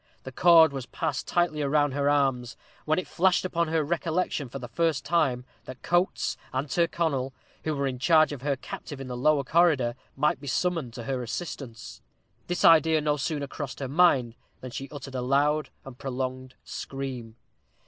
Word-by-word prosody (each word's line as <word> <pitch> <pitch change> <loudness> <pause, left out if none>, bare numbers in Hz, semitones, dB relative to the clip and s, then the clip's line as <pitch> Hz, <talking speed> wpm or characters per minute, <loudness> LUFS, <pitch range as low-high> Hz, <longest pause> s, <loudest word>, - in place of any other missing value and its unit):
The 130 - -7
cord 165 +1 +6
was 130 -2 -5
passed 145 +2 -3
tightly 175 -3 +1
round 145 0 +2
her 140 +1 +1
arms, 135 -4 +1 0.3
when 155 0 +2
it 185 - -1
flashed 185 +1 +2
upon 170 -2 0
her 160 0 +1
recollection 165 -3 -1
for 135 - -6
the 120 -2 -7
first 155 +1 0
time 135 -7 +1 0.2
that 130 0 -10
Coates 175 +2 +1
and 130 +3 -2
Tyrconnel, 155 -5 0 0.3
who 155 -1 0
were 140 0 -1
in 130 -2 -3
charge 155 +2 +4
of 140 -4 -6
her 140 0 0
captive 135 +2 -8
in 135 - -6
the 125 -1 -5
lower 140 +3 +2
corridor, 145 -5 +3 0.2
might 145 -1 +1
be 140 - -9
summoned 165 -6 -1
to 120 - -6
her 130 0 -2
assistance. 120 - -6 0.5
This 175 0 0
idea 160 -1 +6
no 150 -1 +1
sooner 145 0 -2
crossed 140 0 -6
her 135 - -3
mind 135 -6 +3 0.3
than 130 - -8
she 135 +3 -6
uttered 140 -2 -9
a 130 - -2
loud 145 +4 +1 0.2
and 135 -2 -9
prolonged 130 -1 -4
scream. 130 -5 -6
140 Hz, 180 wpm, -27 LUFS, 130-160 Hz, 0.5 s, cord